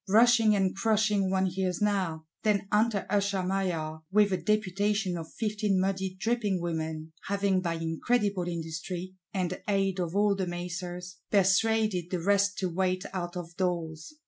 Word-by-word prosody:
Rushing 225 0 +6
and 190 -2 +1
crushing 210 -2 +2
one 190 0 +2
hears 185 -1 -1
now; 185 -7 0 0.2
then 205 -2 +1
enter 210 -1 +2
Usher 200 -1 +1
Maillard, 175 -5 -2
with 205 -1 +4
a - - +2
Deputation 205 -2 0
of 165 -2 -6
Fifteen 210 -3 0
muddy 190 0 -1
dripping 220 -4 0
Women,—having 165 +4 -2
by 170 -2 -1
incredible 180 +4 0
industry, 170 +2 -4 0.2
and 185 -2 -2
aid 195 -2 +1
of 175 0 -2
all 205 0 +4
the 190 -2 -2
macers, 180 +1 -5
persuaded 205 -1 +3
the 180 - -1
rest 200 +2 +2
to 185 - 0
wait 185 +1 0
out 175 -1 -4
of 170 -1 -7
doors. 170 - -2
190 Hz, 145 wpm, -29 LUFS, 175-205 Hz, 0.2 s, Rushing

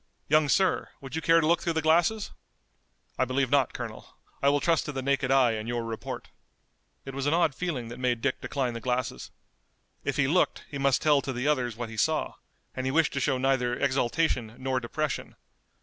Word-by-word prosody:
Young 155 -1 +4
sir, 190 +4 +2
would 135 +2 -8
you 160 - -1
care 165 +1 +5
to 160 - +1
look 170 +2 +3
through 170 - -1
the 160 - 0
glasses?" 175 +7 +2 0.9
"I 130 - +3
believe 130 0 0
not, 140 -3 +3
Colonel. - - -8 0.2
I 140 - +4
will 145 0 +3
trust 165 +1 +2
to - - -3
the 135 -2 -4
naked 140 -1 +1
eye 135 -3 +5
and 110 0 -4
your 120 -1 -2
report." 115 -1 -6 0.8
It 135 - -7
was 135 +1 -2
an 150 - +3
odd 170 -4 +2
feeling 135 -9 -3
that 120 - -8
made 125 -2 0
Dick 130 +2 -1
decline 130 -4 -2
the 115 - -6
glasses. 125 0 -2 0.7
If - - -2
he 135 - +3
looked 180 +6 +1
he 140 - -6
must 135 -1 +2
tell 150 -2 +4
to 135 - -4
the 125 +3 -2
others 125 -6 +1
what 120 -2 -4
he 115 - -9
saw, 155 +7 +1 0.4
and 130 0 -2
he - - +1
wished 160 +2 +2
to 140 - -1
show 130 - +1
neither 130 -2 +1
exultation 130 -3 0
nor 130 0 -1
depression. 140 +4 -3
135 Hz, 210 wpm, -28 LUFS, 125-155 Hz, 0.9 s, care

